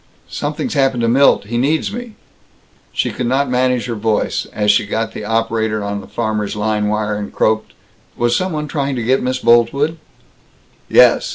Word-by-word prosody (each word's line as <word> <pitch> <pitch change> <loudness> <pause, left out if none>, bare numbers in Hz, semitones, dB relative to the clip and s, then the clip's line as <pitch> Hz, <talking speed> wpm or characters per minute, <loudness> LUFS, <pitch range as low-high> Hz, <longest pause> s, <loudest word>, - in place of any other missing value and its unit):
"Something's 255 - -3
happened 135 -4 +1
to 115 - +1
Milt. 135 +1 +4
He 120 +3 -2
needs 155 +9 0
me!" 240 -1 -7 0.8
She - - -1
could 125 - -3
not 135 +1 +1
manage 125 -1 +1
her 120 - -3
voice, 110 -1 -1
as 105 -1 +2
she 105 0 +1
got 110 +1 -2
the - - -6
operator 110 -1 -1
on 100 0 -3
the - - -13
farmers' 110 -3 -2
line 105 0 0
wire, 105 0 -1
and 105 -1 -5
croaked, 110 0 0 0.4
"Was 120 0 +1
some 185 +5 -1
one 150 -1 -3
trying 140 -2 -2
to 120 - -3
get 130 +4 +2
Miss 130 +1 -1
Boltwood?" 125 +7 +2 0.9
"Yes. - - +5
120 Hz, 180 wpm, -17 LUFS, 110-135 Hz, 0.9 s, Yes